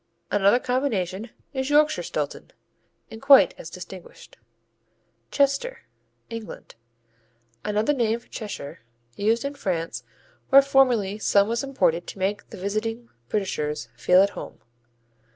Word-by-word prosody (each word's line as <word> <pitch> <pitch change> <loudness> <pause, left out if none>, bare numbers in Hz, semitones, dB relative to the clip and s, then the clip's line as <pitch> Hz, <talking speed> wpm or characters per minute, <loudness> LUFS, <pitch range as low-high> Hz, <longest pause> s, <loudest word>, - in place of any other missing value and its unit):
Another 205 +3 +4
combination 230 -6 -2 0.2
is 265 0 -2
Yorkshire 305 +1 +3
Stilton, - - -4 0.6
and 220 - -9
quite 275 0 +7
as 160 - -8
distinguished. 185 0 -11 0.9
Chester 280 - 0 0.4
England 230 -1 -8 0.9
Another 210 +7 +1
name 230 -4 0
for - - -25
Cheshire, 205 -10 -7 0.4
used 225 +4 +1
in 280 - -3
France 180 -11 -3 0.5
where 275 0 +8
formerly 245 -7 +2
some 200 -1 +3
was 235 +4 -1
imported 175 -11 0
to - - -8
make 195 +2 -2
the - - -10
visiting 220 +5 -3 0.2
Britishers 150 - -2
feel 180 +10 +5
at 200 - 0
home. - - -9
220 Hz, 120 wpm, -24 LUFS, 195-265 Hz, 0.9 s, where